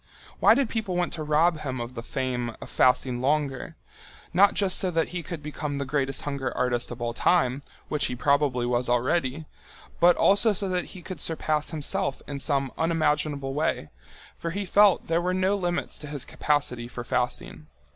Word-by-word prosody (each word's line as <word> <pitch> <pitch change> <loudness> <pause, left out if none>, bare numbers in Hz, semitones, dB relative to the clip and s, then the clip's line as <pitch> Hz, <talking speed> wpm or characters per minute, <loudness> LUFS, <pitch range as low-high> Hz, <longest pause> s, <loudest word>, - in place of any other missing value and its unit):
Why - - +6
did 275 -1 +1
people 220 -5 -3
want 175 0 0
to 160 - -4
rob 155 +2 +2
him 130 -4 -4
of 120 +1 -5
the 115 - -6
fame 125 -2 -3
of - - -10
fasting 125 -1 +2
longer, 140 -1 -1 0.6
not 195 +3 +5
just 195 -2 +2
so 185 - +1
that 165 -2 0
he 175 -1 -4
could 165 -2 -7
become 150 -1 -4
the 140 - -2
greatest 135 0 -1
hunger 140 -2 -3
artist 120 -1 0
of 120 0 -6
all 120 0 -2
time, 135 -1 +2 0.3
which 150 - 0
he 125 - -4
probably 140 -2 +1
was 120 0 0
already, 130 +4 0 0.5
but 175 0 +6
also 205 +2 +4
so 200 0 -1
that 180 -1 -1
he 180 - -11
could 175 -4 -7
surpass 155 -2 +1
himself 160 0 -1
in 140 -1 -5
some 140 -2 0
unimaginable 150 -4 0
way, 150 - -1 0.4
for 170 - -5
he 200 +4 -3
felt 200 +1 +4
there 165 +1 +1
were 180 +1 0
no 190 +2 +2
limits 175 -2 -2
to 150 - -8
his 145 -2 -4
capacity 130 -5 -1
for 120 0 -7
fasting. 125 0 -2
150 Hz, 185 wpm, -26 LUFS, 130-175 Hz, 0.6 s, Why